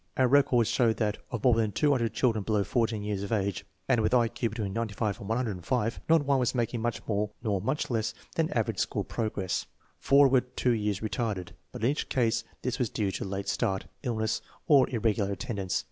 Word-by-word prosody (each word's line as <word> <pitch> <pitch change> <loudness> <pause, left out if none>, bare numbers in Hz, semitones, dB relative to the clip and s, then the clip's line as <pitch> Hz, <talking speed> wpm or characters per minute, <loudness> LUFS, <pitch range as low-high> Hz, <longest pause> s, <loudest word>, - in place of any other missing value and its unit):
Our 130 - +4
records 130 -4 +4
show 115 -3 +3
that, 105 -2 -1
of 120 -4 -4
more 125 -2 +6
than 110 -2 +1
200 130 -3 +2
children 110 -5 +1
below 105 -1 +1
14 110 +1 0
years 105 -2 -2
of 100 - -5
age 100 -3 -1 0.2
and 125 -4 +3
with 110 - +2
I 120 -2 +4
Q 115 - -2
between 105 -3 -4
95 110 -2 -2
and 100 - -8
105, 115 0 -1
not 160 -3 +5
one 140 -1 +3
was 125 0 0
making 120 -1 -1
much 120 0 -2
more 105 -1 0
nor 100 -5 0
much 130 +9 -1
less 110 -2 -1 0.2
than - - +1
average - - 0
school - - 0
progress. 105 -4 -2 0.3
Four 140 0 +6
were 130 -1 +4
two 125 0 -1
years 105 -3 -1
retarded, 110 -5 -2 0.2
but - - -7
in 125 - +4
each 150 - -3
case 115 -2 +1 0.2
this 125 0 -2
was 125 -4 +1
due 100 -3 -1
to - - -4
late 100 0 -4
start, 100 -2 0 0.2
illness, 110 -4 -1 0.3
or 145 -5 +6
irregular 110 -4 0
attendance. 100 -2 -2
115 Hz, 205 wpm, -29 LUFS, 105-125 Hz, 0.3 s, more